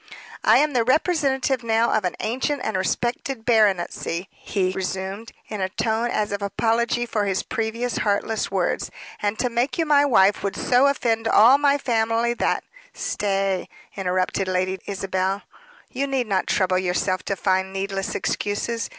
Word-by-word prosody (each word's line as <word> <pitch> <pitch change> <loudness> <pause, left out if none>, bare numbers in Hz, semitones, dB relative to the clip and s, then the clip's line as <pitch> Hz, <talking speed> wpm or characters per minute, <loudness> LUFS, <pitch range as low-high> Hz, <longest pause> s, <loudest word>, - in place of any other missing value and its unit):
"I - - +6
am 300 0 +2
the 240 -2 +3
representative 270 -2 +1
now 230 0 +2
of 215 -3 +1
an 180 - -1
ancient 260 +5 -1
and 220 - -2
respected 240 +5 -2
baronetcy," 195 -5 +1
he 185 -3 -2
resumed, 190 +3 -4 0.2
in 210 -2 -5
a 190 - 0
tone 225 +4 -1
as 210 -3 -1
of 205 0 -3
apology 230 +4 0
for 215 -3 -1
his 195 -1 -1
previous 230 +2 -2
heartless 210 +1 0
words, 190 -2 -1 0.3
"and 205 +1 -1
to 250 - 0
make 240 +3 -1
you 330 - +1
my 290 -2 +5
wife 205 -7 +4
would 200 0 -2
so 250 +2 +3
offend 230 -5 0
all 235 +6 +6
my 285 -1 +3
family, 230 -2 +1
that - - 0 0.2
" - - -30 0.2
"Stay," 195 -2 -1 0.3
interrupted 185 0 -1
Lady 185 +1 -1
Isabel, 195 0 -2 0.5
"you 275 +2 -2
need 265 -3 0
not 195 -4 0
trouble 185 -1 +2
yourself 185 0 0
to 200 - -1
find 190 0 0
needless 195 0 -3
excuses. 210 +2 -2
215 Hz, 160 wpm, -23 LUFS, 190-240 Hz, 0.5 s, I